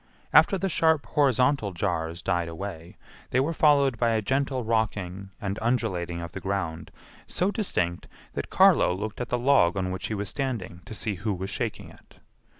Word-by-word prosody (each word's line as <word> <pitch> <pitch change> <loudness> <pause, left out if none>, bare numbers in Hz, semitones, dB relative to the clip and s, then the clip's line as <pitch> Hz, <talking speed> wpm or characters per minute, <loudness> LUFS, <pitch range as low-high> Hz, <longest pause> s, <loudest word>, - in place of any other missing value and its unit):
After 195 - +6
the 195 - -1
sharp 160 -6 +2
horizontal 130 -4 +2
jars 85 -2 -2
died 85 -3 0
away, 85 0 -7 0.3
they 125 - +2
were 145 +5 +1
followed 140 -6 +3
by 120 - +3
a 110 -1 +1
gentle 135 +2 0
rocking 105 -4 -1
and 100 -2 -3
undulating 95 -8 -1
of 85 -1 -6
the - - -6
ground 85 -4 -3 0.4
so 185 +3 0
distinct 90 - -1 0.3
that - - -4
Carlo 90 - +5
looked 105 +4 -5
at 125 - -4
the 125 - +1
log 120 -8 +3
on 95 -1 -1
which 95 - -4
he 110 - -3
was 100 0 -3
standing 115 -9 -3
to 110 - -8
see 105 +2 -1
who 105 -3 -1
was 95 +2 -5
shaking - - -3
it. - - -20
105 Hz, 180 wpm, -26 LUFS, 90-130 Hz, 0.4 s, After